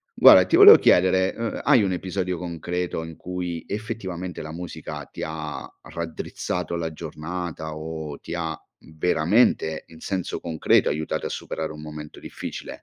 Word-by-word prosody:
Guarda, - - +9
ti - - +2
volevo - - +11
chiedere: 95 +1 +4
uhm, 115 -1 -3
hai 115 - +5
un 95 - 0
episodio 90 0 -2
concreto 85 0 -3
in 80 -1 -9
cui 90 -2 -4
effettivamente 95 -5 -5
la 80 - -7
musica 90 +2 -7
ti - - -10
ha 80 -1 -5 0.2
raddrizzato 85 +1 -4
la 85 -1 -3
giornata 80 0 -6
o 80 -2 -6
ti - - -8
ha 80 -3 -3 0.3
veramente, 80 +1 +2
in 80 - -15
senso 95 0 -3
concreto, 80 -2 +2
aiutato 75 +2 -2
a - - -6
superare 80 -1 -4
un 75 0 -9
momento 75 -1 -9
difficile? - - -7
85 Hz, 150 wpm, -24 LUFS, 80-90 Hz, 0.3 s, volevo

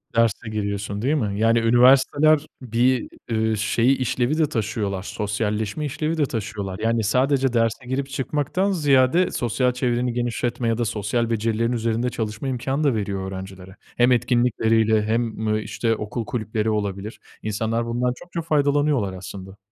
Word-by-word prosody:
Derse 115 0 +1
giriyorsun 100 -1 -3
değil 140 +6 +1
mi? 105 -8 -1
Yani 115 +1 +4
üniversiteler 135 +6 +5 0.2
bir, 125 +1 +1 0.2
ııı, 110 -1 +1
şeyi, 115 +5 +2
işlevi 130 +3 0
de 155 -3 +2
taşıyorlar, 105 -6 -2
sosyalleşme 105 +5 -2
işlevi 155 +3 -2
de 155 - +2
taşıyorlar. 100 -6 -5
Yani, 115 +1 +1
sadece 130 +4 +2
derse 115 +1 0
girip 135 +2 -2
çıkmaktan 145 +8 -1
ziyade, 145 0 +3
sosyal 125 +1 0
çevreni 125 -1 -1
genişletme 120 0 -2
ya 115 -1 +1
da 120 - 0
sosyal 110 +3 -1
becerilerin 115 +1 0
üzerinde 115 0 0
çalışma 110 +1 -4
imkânı 135 +3 -1
da 140 -5 +2
veriyor 100 -2 -3
öğrencilere. 95 0 -9 0.2
Hem 120 +1 +4
etkinlikleriyle 115 -3 +2
hem 110 -1 -1
işte 115 +1 -1
okul 110 +2 -4
kulüpleri 110 -1 -2
olabilir. 105 0 -3 0.2
İnsanlar 110 +2 -1
bundan 120 +1 0
çokça 175 -1 -6
faydalanıyorlar 145 - +1
aslında. 95 +1 -9
115 Hz, 145 wpm, -23 LUFS, 105-130 Hz, 0.2 s, üniversiteler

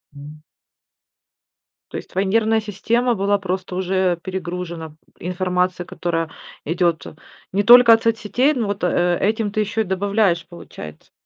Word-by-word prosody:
М. 150 +2 -12 1.5
То - - -6
есть - - -9
твоя 190 +2 -1
нервная 220 +2 +2
система 230 +4 0
была 200 +1 +1
просто 185 -1 -4
уже, 185 +1 -2
э, 185 -2 +2
перегружена 175 -3 -6 0.2
информацией, 180 0 -1
которая 165 -2 -3 0.4
идет 170 +1 0 0.5
не 200 +2 +1
только 240 +1 +9
от 225 - +2
соцсетей, 230 +5 +1
ну, 235 -6 -2
вот, 200 -1 -4
э, 175 0 +2
этим 215 0 0
ты 215 - -2
еще 215 +2 -1
и - - -1
добавляешь, 190 -2 +1
получается. 75 - -11
190 Hz, 145 wpm, -21 LUFS, 175-215 Hz, 1.5 s, только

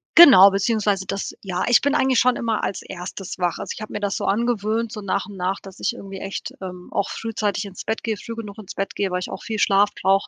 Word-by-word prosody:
Genau 260 - +10
beziehungsweise 200 -1 0
das 195 - -4
ja, 185 -2 -2
ich 240 - +6
bin 285 +1 +1
eigentlich 265 -4 +3
schon 250 0 +3
immer 225 -2 -1
als - - -2
1. 185 +1 -7
wach. 175 -2 -1
Also, - - -4
ich - - -9
hab 215 - -6
mir 210 - -3
das 205 -1 -1
so - - -3
angewöhnt, 225 0 0
so 210 - -6
nach 200 +1 -1
und 200 -2 -10
nach, 185 +2 -1
dass 195 -1 -13
ich - - 0
irgendwie 195 -1 -9
echt, 195 0 -5
ähm, 180 -1 -8
auch 200 - -1
frühzeitig 210 -2 -2
ins 195 -2 -8
Bett 220 - -2
gehe, 220 -2 -1
früh 230 - -7
genug 210 -2 -8
ins 210 -4 -9
Bett 195 0 -3
gehe, 195 -2 -1
weil 180 - 0
ich 180 - -5
auch - - -7
viel 220 -2 -3
Schlaf 200 +1 +4
brauche, 195 +1 +3
200 Hz, 255 wpm, -22 LUFS, 195-225 Hz, -, Genau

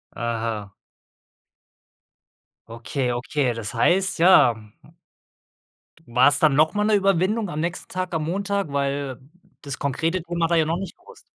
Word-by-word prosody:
Aha. 115 -4 -3 2.0
Okay, 120 +3 -3
okay, 125 +1 -1
das 115 0 -6
heißt, 180 +10 +1
ja, 170 -9 +6
mhm 105 -1 -18 1.0
d - - -27
war's 125 +4 +4
dann 150 -3 +4
noch 155 +2 +3
mal 210 - 0
'ne 215 - +3
Überwindung 195 +2 +1
am 150 - -4
nächsten 170 +2 -3
Tag 185 -1 -4
am 155 -1 -1
Montag? 200 -1 -2
Weil 140 -2 -2 0.4
das 140 -2 -6
konkrete 165 +6 -1
Thema 170 -1 -1
war 170 - +2
ja 160 - +4
da - - -4
noch 170 - 0
nicht 195 - -7
bewusst. 470 +7 -17
155 Hz, 155 wpm, -23 LUFS, 125-185 Hz, 2.0 s, ja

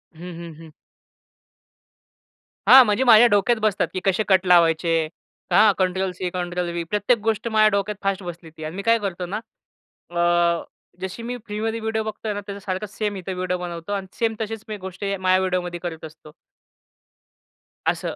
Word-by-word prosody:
हं, 160 - -14 0.2
हं, 170 -1 -8
हं. 165 -1 -12 2.0
हां. 265 0 +10
म्हणजे 210 +3 +1
माझ्या 240 -1 +8
डोक्यात 205 +4 +3
बसतात 210 -5 +1
की 185 - -2
कसे 195 +2 +2
कट 190 -1 +3
लावायचे, 170 -2 +4 0.6
हां 210 0 +6
कंट्रोल 185 0 0
सी, 180 0 -4
कंट्रोल 175 0 -3
व्ही. 170 0 -3
प्रत्येक 210 +6 +1
गोष्ट 225 +1 0
माझ्या 215 -1 +4
डोक्यात 200 +1 -1
फास्ट 195 0 -1
बसली 170 -2 -8
ती. 160 0 -12
आणि 155 +2 -5
मी 200 - -4
काय 230 +1 +4
करतो 185 -3 -4
ना? 200 +4 -4 0.8
अ, 175 -1 +2 0.4
जशी 190 +5 -5
मी 245 +1 -4
फ्रीमध्ये 220 +1 -3
व्हिडिओ 220 0 -2
बघतोय 215 0 -4
ना 205 - -4
त्याचा 200 0 -6
सारखंच 195 +2 -4
सेम 210 -2 -1
इथं 185 0 -5
व्हिडिओ 180 0 -2
बनवतो 175 0 -6
आणि 195 -1 -3
सेम 225 -1 +1
तशीच 220 0 -4
मी 215 -1 -5
गोष्टी 190 +1 -7
हे 200 - -1
माझ्या 185 0 +3
व्हिडिओमध्ये 180 -2 -2
करत 165 -2 -5
असतो 155 -1 -13 1.6
असं. - - -1
190 Hz, 175 wpm, -23 LUFS, 175-215 Hz, 2.0 s, हां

